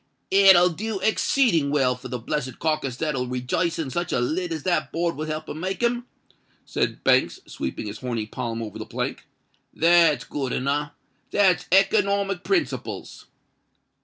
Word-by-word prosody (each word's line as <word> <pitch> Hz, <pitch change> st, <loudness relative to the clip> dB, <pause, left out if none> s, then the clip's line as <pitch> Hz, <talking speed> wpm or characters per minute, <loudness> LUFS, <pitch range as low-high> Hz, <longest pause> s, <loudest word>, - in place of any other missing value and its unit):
"It 195 Hz, -1 st, +8 dB
will 175 Hz, +1 st, +5 dB
do 210 Hz, +4 st, -4 dB
exceeding 220 Hz, -, +2 dB
well 135 Hz, -3 st, +2 dB
for 125 Hz, -, -10 dB
the 125 Hz, -, -4 dB
blessed 130 Hz, +1 st, -4 dB
carkiss 155 Hz, -6 st, -1 dB
that'll 135 Hz, -5 st, -1 dB
rejice 125 Hz, +7 st, -1 dB
in 150 Hz, -5 st, -3 dB
such 175 Hz, +6 st, -2 dB
a -, -, +1 dB
lid 165 Hz, +8 st, -1 dB
as 160 Hz, -2 st, -4 dB
that 155 Hz, -6 st, 0 dB
board 170 Hz, 0 st, -1 dB
will 155 Hz, +1 st, -4 dB
help 155 Hz, 0 st, -4 dB
to -, -, -6 dB
make 185 Hz, +8 st, -4 dB
him," 240 Hz, +1 st, 0 dB, 0.6 s
said -, -, -2 dB
Banks, -, -, +3 dB
sweeping 65 Hz, -, -5 dB
his 105 Hz, +1 st, -6 dB
horny 120 Hz, -4 st, -3 dB
palm 115 Hz, 0 st, -4 dB
over 105 Hz, -3 st, -7 dB
the -, -, -5 dB
plank. -, -, -4 dB, 0.4 s
"That's 165 Hz, -5 st, +4 dB
good 135 Hz, -1 st, -4 dB
enow—that's 150 Hz, +7 st, -1 dB
economic 195 Hz, 0 st, +2 dB
principles." 375 Hz, -5 st, -2 dB
155 Hz, 160 wpm, -24 LUFS, 130-185 Hz, 0.6 s, It